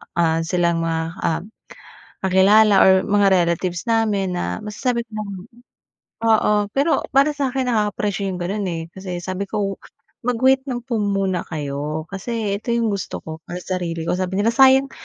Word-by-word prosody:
ah, 165 -1 +2
silang 170 0 0
mga, 165 0 -1 0.2
ah, 165 0 -1 0.8
kakilala, 195 +2 +5
or 190 0 +5
mga 205 -1 +3 0.2
relatives 170 +2 -2
namin, 215 -5 +1
na 90 - -3
masasabi 235 +3 -2
ko 230 - -54
na - - -2 1.1
oo, 215 -1 +4 0.2
pero 290 +4 +2
para 280 +2 +3
sa 285 -2 -1
akin, 255 -1 -1
nakaka-pressure 205 -2 -1
’yong 185 - -3
gano’n, 200 +3 -2
eh. 165 -1 -3
Kasi 190 -2 -6
sabi 190 +1 -4
ko, 200 -2 -2 0.5
mag-wait 260 +2 +3
lang 245 -3 -3
po 240 -2 -2
muna 195 -3 -1
kayo, 150 0 -4
kasi 200 +1 -3
ito 235 +2 -2
’yong 230 -2 +1
gusto 200 -2 -4
ko 160 0 -7
para 180 +1 -6
sa 185 -1 -2
sarili 165 -2 -4
ko. 180 +2 -1
Sabi 185 0 -2
nila, 225 - +3
sayang 265 +2 +5
195 Hz, 165 wpm, -21 LUFS, 175-230 Hz, 1.1 s, kakilala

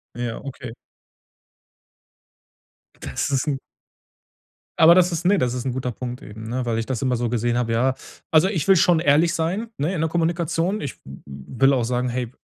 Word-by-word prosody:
Ja, 120 -1 -4
okay. 130 -3 -7 2.3
Das - - -3
ist 135 +1 0
'n. 140 -2 -1 1.2
Aber 165 +1 +8
das 180 -1 +4
ist 170 +1 -3
ne, 200 0 +4
das 125 0 0
ist 125 +1 -4
'n 130 - -1
guter 125 -1 -3
Punkt 125 +2 -7
eben, 110 +2 -9
ne, 125 +2 -2
weil 115 -2 -1
ich 115 - -3
das 130 -1 -3
immer 130 -2 +1
so 120 0 -1
gesehen 120 +1 0
habe, 120 -2 -1
ja. 130 +3 +2 0.4
Also, 160 +4 +5
ich 170 -8 -2
will 190 - +7
schon 170 -1 +4
ehrlich 165 +2 +3
sein, 185 +8 -2
ne, 155 +7 -1
in 165 - -2
der 160 - +1
Kommunikation. 170 +3 -1
Ich 140 - -5
w 70 +1 -11
will 90 - 0
auch 125 -4 +1
sagen: 125 +1 -1
„Hey, 125 0 -3
130 Hz, 195 wpm, -22 LUFS, 120-165 Hz, 2.3 s, Aber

